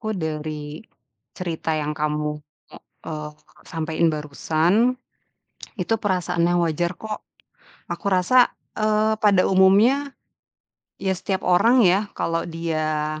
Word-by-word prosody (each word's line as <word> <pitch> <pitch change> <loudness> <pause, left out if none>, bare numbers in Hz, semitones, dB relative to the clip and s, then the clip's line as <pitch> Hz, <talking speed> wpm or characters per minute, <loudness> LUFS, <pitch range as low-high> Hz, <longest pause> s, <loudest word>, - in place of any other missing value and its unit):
Aku 220 -1 -3
dari, 155 0 -5 0.5
cerita 165 -2 -3
yang 150 -1 -2
kamu, 150 0 -2 0.7
eee, 150 -1 -5 0.4
sampein 165 0 -1
barusan, 160 - +1 0.8
itu 200 +1 -1
perasaan 180 -4 0
yang 175 0 +2
wajar 170 +2 -1
kok. 215 -1 -7 0.6
Aku 200 - -6
asa, 240 +8 +4 0.3
eee, 215 0 +2
pada 200 -3 +4
umumnya 215 +10 +4 0.9
ya 190 -1 0
setiap 190 +1 -3
orang 230 +8 +4
yah 195 +3 +3
kalau 165 0 -1
dia, 155 -2 -2
175 Hz, 110 wpm, -23 LUFS, 155-205 Hz, 0.9 s, asa